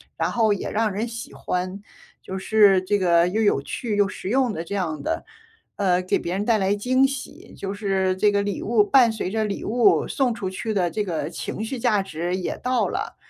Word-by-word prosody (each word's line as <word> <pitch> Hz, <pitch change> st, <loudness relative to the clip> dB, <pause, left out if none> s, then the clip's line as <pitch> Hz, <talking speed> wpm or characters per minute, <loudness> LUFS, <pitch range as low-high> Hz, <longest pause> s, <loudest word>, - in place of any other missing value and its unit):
然 -, -, -1 dB
后 220 Hz, -3 st, +3 dB
也 195 Hz, -, -4 dB
让 215 Hz, -1 st, +1 dB
人 220 Hz, +4 st, -2 dB
喜 230 Hz, 0 st, -8 dB
欢， 185 Hz, +2 st, -3 dB, 0.4 s
就 190 Hz, -, -6 dB
是 200 Hz, -2 st, +4 dB
这 205 Hz, +2 st, +1 dB
个 170 Hz, -2 st, +3 dB
又 215 Hz, +5 st, 0 dB
有 205 Hz, -10 st, +2 dB
趣 215 Hz, -, -4 dB
又 205 Hz, -1 st, +4 dB
实 190 Hz, -, -6 dB
用， 250 Hz, -2 st, +2 dB
这 200 Hz, -, -6 dB
样 160 Hz, -6 st, -2 dB
的， -, -, -2 dB, 0.5 s
呃， 185 Hz, -2 st, +2 dB
给 185 Hz, -, 0 dB
别 175 Hz, -, -4 dB
人 200 Hz, +2 st, -1 dB
带 230 Hz, -2 st, +3 dB
来 195 Hz, 0 st, +1 dB
惊 255 Hz, +6 st, +2 dB
喜， 275 Hz, -1 st, -8 dB
就 195 Hz, 0 st, -4 dB
是 195 Hz, -2 st, 0 dB
这 205 Hz, +2 st, +3 dB
个 200 Hz, 0 st, +1 dB
礼 200 Hz, -1 st, -3 dB
物 220 Hz, -1 st, +3 dB
伴 245 Hz, 0 st, +5 dB
随 220 Hz, -4 st, -3 dB
着 220 Hz, +1 st, -1 dB
礼 200 Hz, -, -4 dB
物 235 Hz, +2 st, +3 dB
送 255 Hz, -4 st, 0 dB
出 200 Hz, -4 st, -4 dB
去 215 Hz, +4 st, -4 dB
的 180 Hz, -3 st, +1 dB
这 210 Hz, +4 st, -2 dB
个 165 Hz, -5 st, -3 dB
情 210 Hz, -, -5 dB
绪 250 Hz, +3 st, -4 dB
价 210 Hz, -3 st, +2 dB
值 175 Hz, 0 st, -3 dB
也 185 Hz, -, -3 dB
到 250 Hz, 0 st, 0 dB
了， -, -, -4 dB
205 Hz, 235 characters per minute, -23 LUFS, 185-225 Hz, 0.5 s, 伴